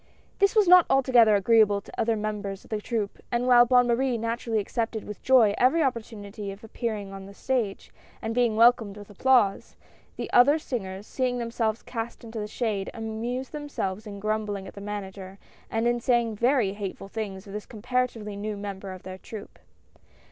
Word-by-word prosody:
" -, -, -35 dB
This 395 Hz, +1 st, +3 dB
was 425 Hz, -3 st, +5 dB
not 360 Hz, -1 st, +8 dB
altogether 245 Hz, -5 st, +5 dB
agreeable 210 Hz, 0 st, +4 dB
to -, -, -15 dB
other 230 Hz, 0 st, +1 dB
mem 215 Hz, -1 st, -3 dB
bers 195 Hz, -1 st, -6 dB
of -, -, -20 dB
the 215 Hz, -1 st, -2 dB
troupe, 215 Hz, -3 st, -3 dB
and 240 Hz, 0 st, 0 dB
while 245 Hz, -1 st, +7 dB
Bonne 250 Hz, 0 st, +5 dB
Marie 245 Hz, +1 st, +1 dB
naturally 230 Hz, 0 st, -2 dB
accepted 225 Hz, +1 st, -2 dB
with 210 Hz, -, -8 dB
joy 240 Hz, -6 st, +5 dB
every 310 Hz, +6 st, +4 dB
opportunity 215 Hz, -5 st, -4 dB
of 195 Hz, +2 st, -12 dB
appearing 215 Hz, -3 st, -4 dB
on 195 Hz, 0 st, -8 dB
the 200 Hz, -, -13 dB
stage 235 Hz, -6 st, -2 dB, 0.3 s
and 225 Hz, -, -3 dB
being 240 Hz, -2 st, +2 dB
welcomed 225 Hz, -3 st, +4 dB
with 205 Hz, 0 st, -11 dB
applause, 225 Hz, -2 st, +2 dB, 0.4 s
the -, -, -4 dB
other 280 Hz, +5 st, +6 dB
singers, 200 Hz, -9 st, -5 dB
seeing 255 Hz, 0 st, -1 dB
themselves 230 Hz, -2 st, -2 dB
cast 230 Hz, 0 st, -6 dB
into 225 Hz, -1 st, -7 dB
the 210 Hz, -, -3 dB
shade, 210 Hz, -4 st, -2 dB
amused 230 Hz, +3 st, -4 dB
themselves 220 Hz, -9 st, -4 dB
in 200 Hz, -1 st, -7 dB
grumbling 210 Hz, -2 st, -2 dB
at -, -, -10 dB
the 200 Hz, -, -10 dB
Manager, 195 Hz, -2 st, -7 dB, 0.3 s
and 225 Hz, +1 st, 0 dB
in 240 Hz, 0 st, +1 dB
saying 235 Hz, -2 st, +1 dB
very 235 Hz, -3 st, +2 dB
hateful 200 Hz, -1 st, -6 dB
things 200 Hz, -2 st, -5 dB
of 200 Hz, -, -10 dB
this 210 Hz, 0 st, -6 dB
comparatively 235 Hz, -2 st, -2 dB
new 210 Hz, +1 st, -4 dB
member 200 Hz, -1 st, -6 dB
of 185 Hz, -, -11 dB
their 185 Hz, 0 st, -8 dB
troupe. 215 Hz, 0 st, -10 dB
220 Hz, 185 wpm, -26 LUFS, 205-240 Hz, 0.4 s, not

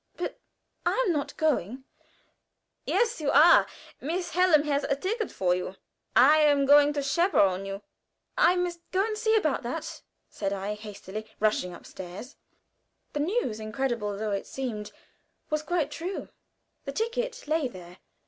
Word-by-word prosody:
"But 350 Hz, -, -4 dB, 0.4 s
I -, -, +2 dB
am 360 Hz, -, +2 dB
not 290 Hz, -2 st, -3 dB
going." 265 Hz, -, 0 dB, 1.0 s
"Yes, 455 Hz, -2 st, +1 dB
you 290 Hz, -, 0 dB
are. 305 Hz, +5 st, +7 dB, 0.3 s
Miss 350 Hz, +5 st, -3 dB
Hallam 350 Hz, -5 st, +4 dB
has 290 Hz, -1 st, 0 dB
a 275 Hz, -, +1 dB
ticket 425 Hz, -, -2 dB
for 180 Hz, -2 st, +1 dB
you. 180 Hz, +1 st, -3 dB, 0.4 s
I 295 Hz, +5 st, +7 dB
am 290 Hz, -2 st, +4 dB
going 290 Hz, +1 st, +6 dB
to 285 Hz, -1 st, -2 dB
chaperon 270 Hz, -, +2 dB
you." 195 Hz, +1 st, -6 dB, 0.5 s
"I 365 Hz, -8 st, +5 dB
must 355 Hz, -1 st, -1 dB
go 385 Hz, +2 st, +2 dB
and 440 Hz, -1 st, -2 dB
see 440 Hz, +1 st, +2 dB
about 315 Hz, -11 st, +1 dB
that," 255 Hz, +6 st, -5 dB, 0.3 s
said 195 Hz, -1 st, -3 dB
I, 200 Hz, +1 st, -3 dB
hastily 210 Hz, 0 st, -8 dB
rushing 210 Hz, -4 st, +1 dB
upstairs. 185 Hz, +11 st, -10 dB, 0.8 s
The 295 Hz, -, -2 dB
news, 300 Hz, -, -1 dB
incredible 215 Hz, -2 st, -2 dB
though 215 Hz, 0 st, -2 dB
it 200 Hz, -, -3 dB
seemed, 225 Hz, -6 st, -5 dB, 0.6 s
was 305 Hz, 0 st, +1 dB
quite 315 Hz, -2 st, -1 dB
true. 360 Hz, +5 st, -5 dB, 0.6 s
The -, -, -4 dB
ticket 470 Hz, -2 st, -3 dB
lay 310 Hz, -2 st, +1 dB
there. 180 Hz, -5 st, -12 dB
285 Hz, 150 wpm, -27 LUFS, 210-350 Hz, 1.0 s, are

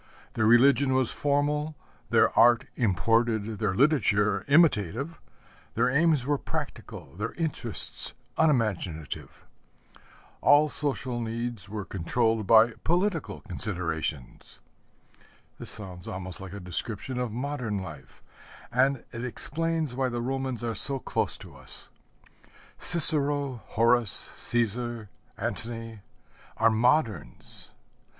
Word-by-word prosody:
Their 110 Hz, -, +1 dB
religion 130 Hz, +3 st, +5 dB
was 130 Hz, -3 st, +3 dB
formal, 150 Hz, +2 st, 0 dB, 0.3 s
their -, -, +3 dB
art 120 Hz, 0 st, +5 dB
imported, 110 Hz, +1 st, 0 dB
their 105 Hz, -4 st, -1 dB
literature 105 Hz, -6 st, +2 dB
imitative, 140 Hz, -, +2 dB, 0.6 s
their 125 Hz, +2 st, +2 dB
aims 150 Hz, -2 st, +2 dB
were 145 Hz, 0 st, 0 dB
practical, 70 Hz, -, -7 dB
their 105 Hz, +3 st, -4 dB
interests 150 Hz, -9 st, -2 dB, 0.2 s
unimaginative. 105 Hz, -, -1 dB, 1.0 s
All 150 Hz, +1 st, +5 dB
social 135 Hz, -5 st, -3 dB
needs 115 Hz, -2 st, -5 dB
were 105 Hz, -2 st, -5 dB
controlled 110 Hz, +4 st, -1 dB
by 115 Hz, +1 st, +6 dB
political 175 Hz, -, -1 dB
considerations. 85 Hz, -, -5 dB, 1.0 s
This -, -, 0 dB
sounds 90 Hz, -4 st, -4 dB
almost 90 Hz, -1 st, -6 dB
like 95 Hz, -1 st, -9 dB
a 100 Hz, -, -7 dB
description 105 Hz, +7 st, -3 dB
of 125 Hz, -3 st, -2 dB
modern 125 Hz, -3 st, -3 dB
life; 80 Hz, -8 st, -10 dB, 0.5 s
and 130 Hz, +2 st, +1 dB
it 120 Hz, +1 st, -6 dB
explains 160 Hz, +3 st, +1 dB
why 130 Hz, 0 st, -1 dB
the 120 Hz, -1 st, -4 dB
Romans 130 Hz, -1 st, -3 dB
are 115 Hz, -1 st, -2 dB
so 135 Hz, +6 st, +5 dB
close -, -, -2 dB
to -, -, -13 dB
us. -, -, -10 dB, 0.9 s
Cicero, 145 Hz, -6 st, +5 dB
Horace, 115 Hz, -2 st, +1 dB
Cæsar, 120 Hz, -1 st, 0 dB, 0.3 s
Antony, 115 Hz, -1 st, -5 dB, 0.6 s
are 115 Hz, 0 st, +4 dB
moderns. 115 Hz, -, -1 dB
120 Hz, 110 wpm, -27 LUFS, 105-140 Hz, 1.0 s, by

